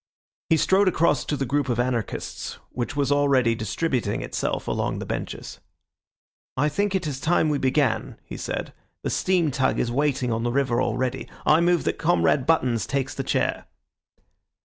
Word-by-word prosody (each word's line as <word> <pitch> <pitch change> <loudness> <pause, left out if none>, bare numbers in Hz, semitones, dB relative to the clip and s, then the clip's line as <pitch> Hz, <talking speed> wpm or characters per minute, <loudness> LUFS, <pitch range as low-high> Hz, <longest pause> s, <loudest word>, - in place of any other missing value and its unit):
He 160 - +5
strode 190 +4 +3
across 165 -5 +2
to 145 - -1
the 135 - -1
group 140 +2 0
of 120 -1 0
anarchists, 120 -3 -2 0.2
which 125 +4 -3
was 145 -1 +1
already 140 -5 +3
distributing 115 0 -1
itself - - -3
along - - -1
the - - -5
benches. - - -5 1.0
"I 145 +3 +2
think 200 +5 0
it 185 -3 0
is 140 -3 -3
time 160 0 +2
we 145 -2 0
began," 135 +1 0
he - - -9
said; - - -4 0.3
"the - - -1
steam 175 -5 +1
tug 130 0 +1
is 120 - 0
waiting 130 -2 0
on 115 - -1
the 120 +1 0
river 130 -2 +1
already. 130 -1 -1 0.2
I 155 +2 +5
move 175 -1 +3
that - - -1
Comrade 155 -5 +2
Buttons 130 -8 +2
takes 135 -2 -1
the - - -3
chair." - - -1
140 Hz, 170 wpm, -24 LUFS, 125-160 Hz, 1.0 s, He